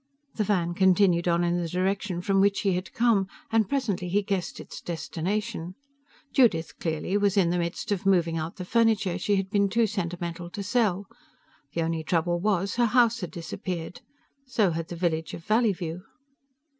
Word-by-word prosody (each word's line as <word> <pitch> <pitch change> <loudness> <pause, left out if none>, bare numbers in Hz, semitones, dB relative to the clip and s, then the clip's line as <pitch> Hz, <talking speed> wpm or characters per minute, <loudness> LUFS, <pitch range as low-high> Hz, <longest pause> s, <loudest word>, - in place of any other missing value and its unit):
The 215 - 0
van 180 -4 0
continued 185 -2 +3
on 170 0 +2
in 175 0 +1
the 170 - -3
direction 185 0 -1
from 195 0 +3
which 200 0 +3
he 195 -2 +2
had 180 0 -3
come, 225 -5 +2 0.2
and 220 -3 +2
presently 210 -10 -1
he 205 +3 +2
guessed 195 -2 -2
its - - -9
destination. 180 +2 -3 0.6
Judith, 185 -11 +2
clearly, 165 +4 -1
was 205 -1 +1
in 175 -3 +4
the 175 - 0
midst 170 +4 -3
of 200 -1 0
moving 175 -4 +2
out 160 +1 -3
the 180 - -6
furniture 220 -4 +2
she 205 +3 +1
had 190 0 -2
been 200 -2 +2
too 230 +3 +3
sentimental 175 -4 -4
to 200 +3 -5
sell. 205 -3 +1 0.7
The 165 - +1
only 160 -1 -2
trouble 175 +1 0
was, 200 +1 0
her 240 -1 +4
house 235 0 +3
had 180 - -4
disappeared. 175 +3 -6 0.5
So 220 -8 +2
had 165 0 -3
the 175 - -6
village 165 -2 -1
of 165 - -11
Valleyview. 195 -7 +1
185 Hz, 180 wpm, -27 LUFS, 170-205 Hz, 0.7 s, in